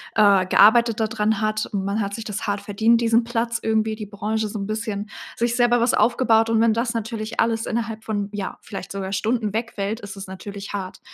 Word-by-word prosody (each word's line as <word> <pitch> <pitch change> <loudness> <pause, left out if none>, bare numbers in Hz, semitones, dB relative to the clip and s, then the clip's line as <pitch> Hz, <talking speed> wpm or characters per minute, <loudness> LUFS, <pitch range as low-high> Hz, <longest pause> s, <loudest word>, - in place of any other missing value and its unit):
äh 200 -3 +5
gearbeitet 225 +4 +5
da 220 - +2
dran 220 -1 0
hat. 215 0 0
Und 195 -2 -3
man 200 +3 -1
hat 200 0 -3
sich 225 - -6
das 210 0 -4
hart 205 0 -1
verdient 220 +3 +2
diesen 230 0 +3
Platz 235 0 -1
irgendwie, 220 0 +1
die 215 -1 -6
Branche 215 +2 -2
so 210 - -6
'n 195 - -4
bisschen 215 -1 -3 0.3
sich 235 0 0
selber 240 0 +3
was 235 +1 +2
aufgebaut. 230 -2 +3
Und 225 -1 +3
wenn 230 -1 +4
das 230 +1 -1
natürlich 225 0 -4
alles 225 0 +1
innerhalb 225 -1 -3
von, 205 -2 -2
ja, 200 -2 -4
vielleicht 195 -2 -8
sogar 195 -1 -4
Stunden 215 +1 0
wegfällt 220 -1 -3
ist 205 0 -8
es 195 - -7
natürlich 195 +2 -8
hart. 190 -2 -5
220 Hz, 215 wpm, -23 LUFS, 205-230 Hz, 0.3 s, äh